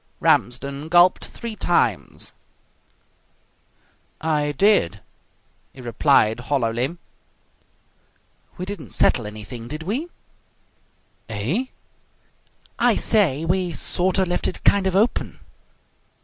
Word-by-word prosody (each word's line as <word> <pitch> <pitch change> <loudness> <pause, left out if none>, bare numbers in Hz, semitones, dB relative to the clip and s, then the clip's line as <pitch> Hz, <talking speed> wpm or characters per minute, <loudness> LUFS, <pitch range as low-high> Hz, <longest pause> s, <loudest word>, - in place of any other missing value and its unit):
Ramsden 140 +4 0
gulped 175 +1 +5
three 230 -2 -7
times. 115 - 0 1.9
"I 150 -2 0
did," 145 - +2 0.7
he 130 - -12
replied 120 -2 +2
hollowly. 125 +3 -1 1.6
"We 180 - -4
didn't 200 -5 -7
settle 115 -4 +3
anything, 110 +3 -8
did 155 +5 -6
we?" 240 - -2 1.2
"Eh?" 120 - -1 1.1
"I - - +4
say, 165 -9 +2
we 180 0 0
sort 180 +5 0
of 190 -1 +2
left 175 - -1
it 185 - -5
kind 200 -1 +4
of 190 - -1
open." 215 +5 0
155 Hz, 95 wpm, -22 LUFS, 120-185 Hz, 1.9 s, gulped